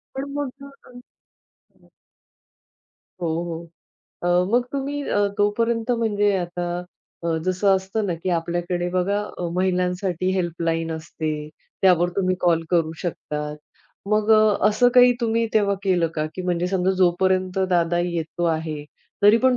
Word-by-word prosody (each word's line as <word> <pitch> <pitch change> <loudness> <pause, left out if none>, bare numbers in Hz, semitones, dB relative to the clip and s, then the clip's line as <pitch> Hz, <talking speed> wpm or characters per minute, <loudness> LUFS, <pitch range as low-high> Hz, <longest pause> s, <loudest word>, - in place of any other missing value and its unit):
पण 270 +1 -3
मग 280 -1 -4
अ, 275 0 -18 0.9
हं. - - -26 1.3
हो, 170 - 0 0.2
हो. 170 -1 -5 0.6
अ, - - -2 0.3
मग 245 +1 +3
तुम्ही 280 +1 -2
अ, 205 0 +2
तोपर्यंत 230 +3 +1
म्हणजे 205 -3 +2
आता 175 -1 -3 0.6
अ, 165 -1 +1
जसं 185 +2 +1
असतं 195 +3 -2
ना, 175 - -1
की 165 +3 -5
आपल्याकडे 175 +1 -2
बघा 185 +3 0 0.3
महिलांसाठी 180 0 0
हेल्पलाईन 165 -2 -1
असते 160 0 -4 0.5
त्यावर 175 -2 +5
तुम्ही 185 -2 +2
कॉल 165 -2 +3
करू 165 -3 +2
शकता. 150 -3 -4 0.7
मग 215 +1 +2
अ, 215 -1 +5
असं 215 +4 +4
काही 250 0 +8
तुम्ही 230 0 +1
तेव्हा 200 -2 +3
केलं 180 -4 +2
का, 155 -1 -1
की 185 - -5
म्हणजे 175 -1 0
समजा 185 0 +1
जोपर्यंत 185 +1 +2
दादा 175 -1 +2
येतो 170 -1 -3
आहे 155 -2 -5 0.4
तरी 205 +2 +7
पण 255 0 +3
185 Hz, 140 wpm, -23 LUFS, 175-210 Hz, 1.3 s, काही